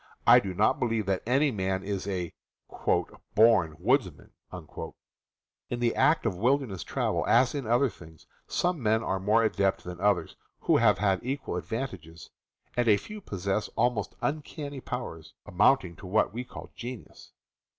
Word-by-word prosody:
I - - +8
do 95 -2 -5
not 105 +4 +2
believe 115 -3 0
that 95 -1 0
any 140 +4 +3
man 95 -3 -2
is 100 -1 -3
a 90 -4 -3 1.0
"born 105 -8 +5
woodsman." 100 - 0 1.4
In 120 - -3
the 120 -1 +1
art 150 -3 +3
of 110 -5 0
wil 125 +9 +3
derness 105 - -6
travel, - - -1
as 120 +2 +4
in 140 -6 -4
other 120 +4 +3
things, 80 - -13 0.2
some 175 -4 0
men 110 0 +2
are 95 -2 -1
more 105 +4 +3
adept 100 -3 +1
than 90 0 -8
others 100 -3 +1 0.3
who - - +3
have 105 -4 +4
had 95 -1 +1
equal 135 +2 -3
advantages, 95 - -6 0.4
and 120 -1 +1
a 105 -2 +6
few 210 - -9
possess 100 - -2
almost 115 -4 0
uncanny 145 -1 -4
powers, 120 -13 -6
amounting 90 -1 +2
to 95 - -10
what 105 +2 +1
we 125 +2 -4
call - - -10
genius. 120 -1 -9
110 Hz, 160 wpm, -28 LUFS, 95-125 Hz, 1.4 s, I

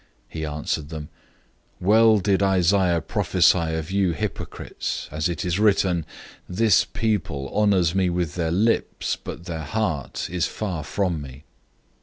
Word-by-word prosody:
007:006 - - -34 0.3
He 80 -1 -3
answered 75 0 -3
them, 80 -2 -7 0.7
"Well 110 +3 +5
did 100 0 +1
Isaiah 95 -2 +3
prophesy 85 0 +2
of 80 +2 -4
you 95 -3 +2
hypocrites, - - -4
as 75 +2 -1
it 85 - -3
is 90 +2 0
written, 95 -6 +2 0.4
'This 105 +2 +3
people 80 -11 -2
honors 95 -5 +3
me 95 -1 +2
with 85 -3 -1
their 85 -2 -1
lips, 105 +7 0
but 85 - -9
their 80 -3 -4
heart 80 -3 -2
is 90 -2 0
far 90 -7 -4
from 85 +1 -1
me. 70 0 -10
90 Hz, 145 wpm, -24 LUFS, 80-100 Hz, 0.7 s, Well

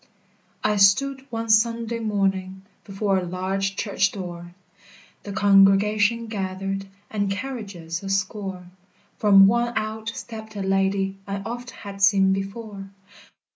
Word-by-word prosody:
I 210 0 +2
stood, 265 +8 +3
one 230 -1 -4
Sunday 230 +1 +2
morning, 195 -3 -1 0.2
Before 195 -1 0
a - - -4
large 190 +2 -2
church 200 -1 0
door, 175 -2 -8 0.7
The 205 - -8
congregation 205 +2 +4
gathered, 195 -2 -4 0.2
And 205 -2 -1
carriages 195 -7 -5
a 195 - -6
score, 195 -1 -2 0.5
From 195 -2 +7
one 235 +3 +2
out 220 +1 -3
stepped 220 -2 -8
a 200 - -3
lady 195 0 0
I 200 0 -3
oft 240 +1 -5
had 200 -3 -9
seen 195 -1 +5
before. 195 0 -6
200 Hz, 125 wpm, -24 LUFS, 195-220 Hz, 0.7 s, From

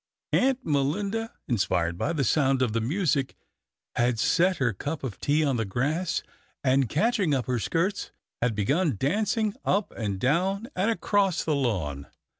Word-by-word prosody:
Aunt 265 0 +2
Melinda, 195 +11 0 0.2
inspired 90 -7 0
by 140 - -1
the 150 -5 0
sound 135 -2 +2
of 115 -4 0
the 115 - 0
music, 145 - 0 0.6
had 120 -1 +2
set 180 +10 +2
her 120 -4 +1
cup 145 - -5
of 115 -8 -5
tea 150 +2 +2
on 135 -3 +1
the 115 - 0
grass, 145 - -1 0.4
and, 130 -2 +3
catching 200 - +2
up 125 -4 -1
her 125 0 0
skirts, 175 - -1 0.3
had 120 -2 +1
begun 145 - +1
dancing 205 - 0
up 200 +1 0
and 100 -4 -3
down 190 - +1
and 195 +5 +1
across 200 -5 +1
the 155 - 0
lawn. 85 - -2
145 Hz, 160 wpm, -27 LUFS, 120-190 Hz, 0.6 s, and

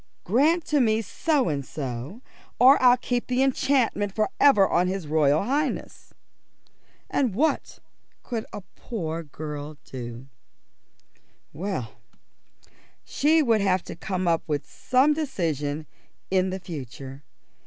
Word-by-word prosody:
"Grant 305 - +2
to 295 - +1
me 220 -1 +2
so 290 - 0
and 145 -4 -1
so, 135 - -6 0.3
or 260 +3 +7
I'll 250 -1 +6
keep 245 0 -2
the 255 +1 +2
enchantment 255 -7 +1
for 215 -1 0
ever 210 -9 +6
on 180 +1 +2
his 190 -2 -3
Royal 150 0 +2
Highness." 280 +5 -2 1.0
And 250 -8 0
what 310 +8 0 0.5
could 230 -3 -4
a - - -7
poor 165 -8 -4
girl 150 -1 -7
do? 120 -1 -8 1.3
Well, 165 - -4 1.1
she 310 +2 +2
would 225 -5 +3
have 190 -2 +1
to - - -8
come 185 +1 -3
to 160 -3 0
some 265 +4 +2
decision 160 - -2 0.5
in 190 0 +2
the 190 +1 -4
future. 135 -5 -8
195 Hz, 120 wpm, -25 LUFS, 155-255 Hz, 1.3 s, or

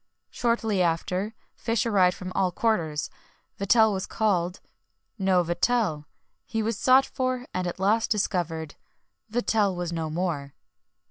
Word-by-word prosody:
Shortly 225 -5 0
after, 180 +5 -1 0.2
fish 230 0 -1
arrived 190 -5 +3
from 185 0 -6
all 185 -2 +1
quarters. 165 -8 0 0.5
Vatel 220 +2 +4
was 190 0 -3
called 185 -5 0 0.6
no 190 -2 +3
Vatel! 175 -2 0 0.4
He 225 -1 -1
was 225 +1 -1
sought 260 +5 +5
for, 255 -1 -2
and 185 -1 -1
at 175 - -5
last 215 +4 +2
discovered 170 -7 -1 0.6
Vatel 215 -4 +1
was 175 -1 -3
no 160 -2 -2
more! 155 -4 -3
190 Hz, 130 wpm, -26 LUFS, 175-225 Hz, 0.6 s, sought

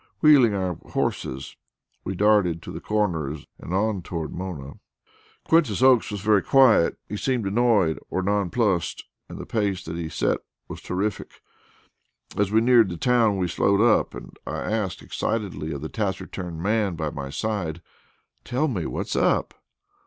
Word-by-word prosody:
Wheeling 135 -9 +6
our 90 -4 -2 0.2
horses, 65 +1 -3 0.5
we 95 - -4
darted 95 -5 +3
to - - -7
the - - -7
Corners 80 -9 -1
and - - -8
on 100 +1 0
toward 85 -2 -5
Mona. 85 -7 -6 0.6
Quintus 135 - +2
Oakes 130 -3 +5
was 105 -2 -5
very 105 -1 +3
quiet; 130 -9 +4
he 105 - -5
seemed 125 0 -1
annoyed 100 -5 +2
or 95 - -1
nonplussed 100 -1 0 0.3
and - - -8
the - - -7
pace 100 -4 -1
that 80 +1 -5
he 85 -2 -4
set - - 0 0.3
was - - -8
terrific. 100 +2 -4 0.9
As 105 -1 0
we 110 +1 +4
neared 120 -4 +5
the 85 - -5
town 115 -2 +3
we 90 -1 0
slowed 100 +3 +2
up, 115 0 +3
and - - -10
I - - -3
asked 105 -5 -2
excitedly 100 -8 -3
of 70 -3 -5
the 80 - -4
taciturn 95 -4 -4
man 100 0 0
by 80 -2 -3
my 70 -3 -6
side: 85 0 -3 0.6
"Tell 135 +6 0
me, 95 - -2
what's - - -3
up?" - - +1
100 Hz, 160 wpm, -24 LUFS, 85-110 Hz, 0.9 s, Wheeling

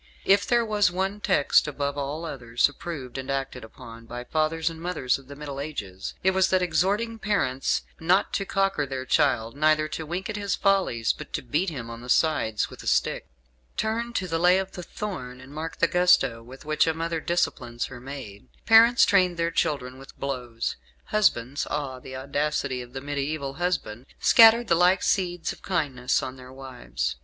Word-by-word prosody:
If 200 +1 +4
there 240 -1 +3
was 210 -2 +2
one 190 +3 -2
text, 185 -8 +3
above 140 -1 -2
all 145 +3 -4
others, 125 -6 +1
approved 145 -4 -7
and 130 - -7
acted 135 -2 -3
upon 115 +1 -12
by 120 +1 -6
fathers 155 +4 -1
and 165 -1 -2
mothers 165 -8 -1
of 135 - -18
the 140 - -9
Middle 140 -1 -7
Ages, 100 -11 -6
it 190 - +4
was 190 0 +2
that 185 -1 +2
exhorting 200 +7 0
parents 135 -13 0 0.2
not 180 +4 +2
to 195 - 0
cocker 195 -7 0
their 130 -1 -4
child, 130 -4 +1
neither 155 +1 +3
to 160 - -5
wink 180 +5 -3
at 215 - -4
his 200 -2 -1
follies, 190 - +1
but - - -10
to - - -2
beat 155 +9 0
him 125 -7 -7
on 115 0 -8
the 125 - -10
sides 120 -8 +2
with - - -12
a - - -9
stick. - - +1 0.5
Turn 230 +2 -1
to 185 -5 -1
"The 165 -1 -1
Lay 180 +2 +5
of 190 0 -2
the 180 - -7
Thorn," 145 -11 -6
and 135 +2 -13
mark 160 +2 -5
the 170 - +3
gusto 165 -9 +3
with 130 +4 -13
which 155 +1 +2
a 160 - +1
mother 165 0 -2
disciplines 120 -8 -1
her 125 -2 -9
maid. 130 -5 -9 0.2
Parents 230 +2 +7
trained 185 -4 +3
their 170 0 0
children 140 -6 -1
with 135 - -14
blows. 125 -4 -3 0.3
Husbands 140 - +1
(ah, 140 -3 -3
the 130 +1 -9
audacity 140 -1 -2
of 120 0 -11
the 135 - -5
mediaeval 140 0 -3
husband) 140 -8 -3
scattered 230 +1 +7
the - - +3
like 180 +2 +4
seeds 175 -3 0
of - - -17
kindness 140 -9 0
on 130 0 -6
their 130 0 -12
wives. 120 - -5
150 Hz, 190 wpm, -26 LUFS, 130-180 Hz, 0.5 s, Parents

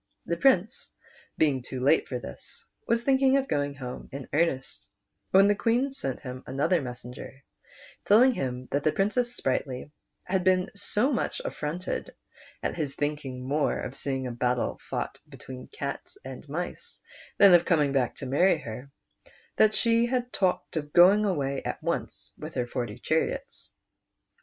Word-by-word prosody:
The 170 - -1
Prince 215 +1 +2 0.5
being 140 -4 +2
too 130 +1 -6
late 140 +5 +3
for 125 - -3
this, 85 - -9 0.2
was 230 0 +2
thinking 270 +1 +4
of 270 0 0
going 145 -1 -1
home 125 -2 -7
in 135 -1 -7
earnest, 145 -4 0 0.4
when 195 +1 +6
the 205 - +5
Queen 240 +6 +1
sent 135 - -4
him 130 0 -7
another 155 +6 +1
messenger, 125 +1 -9 0.6
telling 240 +6 +6
him 130 - -4
that 140 0 0
the 155 - +3
Princess 240 +7 0
Sprightly 130 +1 -2 0.3
had 185 0 0
been 185 0 +2
so 210 +6 +1
much - - -1
affronted 170 +5 -4 0.5
at - - -1
his 145 -4 -3
think 145 0 -2
ing 125 -1 -6
more 145 +2 +1
of 125 - -5
seeing 135 -1 -2
a 125 - -3
battle 125 +1 -1
fought - - -3
between 130 -1 -10
cats 140 0 -6
and 135 +2 -9
mice 175 - -5 0.4
than 200 -2 +8
of 175 0 +6
coming 150 -5 +3
back 130 -3 +1
to - - -7
marry 160 +8 +3
her, 125 -1 -8 0.7
that 215 0 +5
she 230 0 +3
had 250 0 -2
talked 185 -3 0
of 150 -1 -4
going 195 +5 +7
away 140 -8 -1
at - - -3
once - - -3
with - - -8
her 125 - 0
forty 120 -3 -4
chariots. 160 +1 -2
150 Hz, 160 wpm, -27 LUFS, 130-200 Hz, 0.7 s, than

